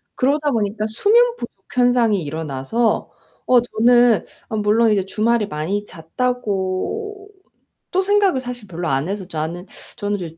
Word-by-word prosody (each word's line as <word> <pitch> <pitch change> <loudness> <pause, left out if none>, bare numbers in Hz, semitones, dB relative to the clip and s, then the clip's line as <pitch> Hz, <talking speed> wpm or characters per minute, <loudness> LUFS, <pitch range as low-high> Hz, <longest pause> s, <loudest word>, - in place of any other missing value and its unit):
그러다 290 +3 +1
보니까 215 -2 -1
수면 465 - +3
부족 - - -7 0.2
현상이 245 -6 +3
일어나서 155 - -1 0.3
어 250 -1 +5
저는 240 0 +3 0.2
아 220 - -3
물론 215 +2 +3
이제 195 -3 +1
주말에 220 +2 +1
많이 190 +4 -2
잤다고 245 - -3 0.6
또 375 - +2
생각을 400 -6 +2
사실 245 -4 -7
별로 175 -1 -4
안 135 +6 0
해서 200 -1 -4
나는 165 +3 -4 0.3
저는 205 -2 -2
이제 165 -2 -7
220 Hz, 290 characters per minute, -20 LUFS, 185-250 Hz, 0.6 s, 어